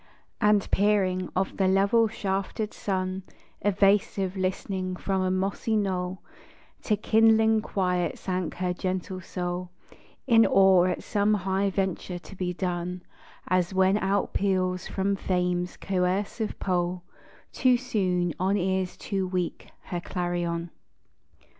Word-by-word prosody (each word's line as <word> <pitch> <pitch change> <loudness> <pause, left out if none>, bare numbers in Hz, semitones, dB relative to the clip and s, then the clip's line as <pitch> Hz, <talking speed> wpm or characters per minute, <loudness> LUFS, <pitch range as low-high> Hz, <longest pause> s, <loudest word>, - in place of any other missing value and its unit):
And 210 -2 +3
peering, 190 -3 +2
of 190 +1 -1
the 190 - +2
level 200 +4 +4
shafted 200 +1 -3
sun 185 -1 -2 0.4
Evasive, 195 -1 +2
listening 185 0 -2
from 190 +1 -1
a 185 - +1
mossy 195 +4 -1
knoll, 185 -2 -2 0.6
To 210 - +2
kindling 220 +1 +4
quiet 180 -4 -1
sank 180 -3 -3
her 180 0 -1
gentle 185 +1 -3
soul, 180 0 -4 0.6
In 230 -4 +6
awe 190 -2 +5
at 185 - -1
some 210 0 +2
high 195 +1 0
venture 190 -2 -2
to 185 +3 -12
be 180 -1 -2
done, 180 0 -3 0.4
As 185 +1 +1
when 190 +1 +4
outpeals 190 -2 0
from 195 +1 0
Fame's 180 -2 -1
coercive 195 +4 -1
pole, 180 -1 -1 0.5
Too 255 -2 +4
soon, 185 -8 0
on 190 +3 +2
ears 190 -1 -1
too 195 -2 -2
weak, 180 -2 -3 0.2
her 175 - -4
clarion. 175 -2 -2
190 Hz, 120 wpm, -27 LUFS, 180-200 Hz, 0.6 s, In